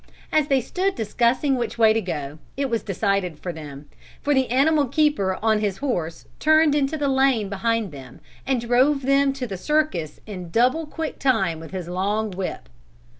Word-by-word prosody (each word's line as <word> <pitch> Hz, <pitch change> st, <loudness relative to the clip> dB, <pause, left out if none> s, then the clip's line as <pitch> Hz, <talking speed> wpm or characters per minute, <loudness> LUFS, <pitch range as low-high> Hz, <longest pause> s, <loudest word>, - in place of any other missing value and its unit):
As 310 Hz, -2 st, +2 dB
they 270 Hz, -3 st, +3 dB
stood 380 Hz, +9 st, -1 dB
discussing 240 Hz, +5 st, +1 dB
which 240 Hz, -1 st, -3 dB
way 220 Hz, -1 st, +5 dB
to 225 Hz, -, 0 dB
go, 150 Hz, -5 st, -5 dB, 0.2 s
it 275 Hz, -2 st, -1 dB
was 230 Hz, -, 0 dB
decided 195 Hz, -4 st, -1 dB
for 175 Hz, +2 st, -5 dB
them, 145 Hz, -2 st, -9 dB, 0.3 s
for 290 Hz, -, +1 dB
the 265 Hz, -2 st, +2 dB
animal 285 Hz, +3 st, +3 dB
keeper 255 Hz, -10 st, +1 dB
on 220 Hz, -1 st, +3 dB
his 205 Hz, -3 st, -1 dB
horse 175 Hz, -, -3 dB
turned 310 Hz, -1 st, +4 dB
into 290 Hz, +1 st, 0 dB
the 290 Hz, -1 st, 0 dB
lane 265 Hz, -6 st, +2 dB
behind 220 Hz, 0 st, -1 dB
them 130 Hz, -4 st, -11 dB, 0.2 s
and 265 Hz, -2 st, 0 dB
drove 255 Hz, +4 st, +2 dB
them 275 Hz, +1 st, +3 dB
to 270 Hz, -2 st, -4 dB
the 195 Hz, -5 st, -5 dB
circus 300 Hz, -, -1 dB
in 185 Hz, -5 st, -7 dB
double 255 Hz, -, +2 dB
quick 320 Hz, 0 st, -5 dB
time 195 Hz, -12 st, +1 dB
with 160 Hz, -, -9 dB
his 185 Hz, -3 st, -6 dB
long 200 Hz, +4 st, -1 dB
whip. 185 Hz, 0 st, -5 dB
230 Hz, 180 wpm, -23 LUFS, 190-275 Hz, 0.3 s, way